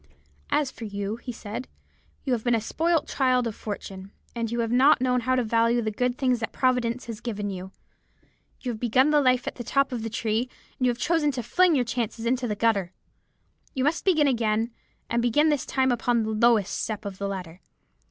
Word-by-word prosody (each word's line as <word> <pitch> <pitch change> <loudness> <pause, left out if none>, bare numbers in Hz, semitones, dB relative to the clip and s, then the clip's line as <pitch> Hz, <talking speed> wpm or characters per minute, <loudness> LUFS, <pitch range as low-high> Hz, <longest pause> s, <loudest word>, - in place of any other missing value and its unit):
"'As 285 -3 +1
for 230 - -8
you,' 200 +1 -4
he 245 +1 -7
said, 225 +2 -6 0.6
'you 265 - 0
have 230 -3 -1
been 240 -1 +3
a - - +2
spoilt 325 +8 0
child 255 -2 +2
of 230 - -2
fortune, 195 -2 -7 0.2
and 230 -1 -2
you 235 0 0
have 230 0 -2
not 265 +5 +5
known 250 0 +2
how 255 +2 +1
to 250 - +1
value 230 +1 +2
the 215 -2 -1
good 245 +3 -1
things 255 -3 +1
that 225 - -3
Providence 250 -2 0
has 230 -3 -7
given 205 -4 -3
you. 190 0 -7 0.9
You 250 - -2
have 220 - -6
begun 255 +5 +3
life 255 -4 +3
at - - -5
the 240 - -5
top 275 +2 +1
of 245 -3 -3
the 225 - -3
tree, 225 +2 -1 0.3
and 255 - +2
you - - +4
have 240 - -1
chosen 320 +2 +1
to 250 -2 -3
fling 355 +8 +3
your 250 -3 +2
chances 235 -1 -3
into 250 +1 0
the 210 - -2
gutter. 200 -5 +1 0.8
You 260 - 0
must 300 +4 +1
begin 315 -6 +4
again, 225 -2 +1 0.4
and 235 0 0
begin 295 +6 +3
this 295 -3 0
time 260 -1 +2
upon 240 -1 +1
the 220 - -2
lowest 220 -2 +3
step 215 -2 -4
of 195 -2 -6
the 200 - -2
ladder. 185 -3 -6
235 Hz, 215 wpm, -26 LUFS, 220-255 Hz, 0.9 s, not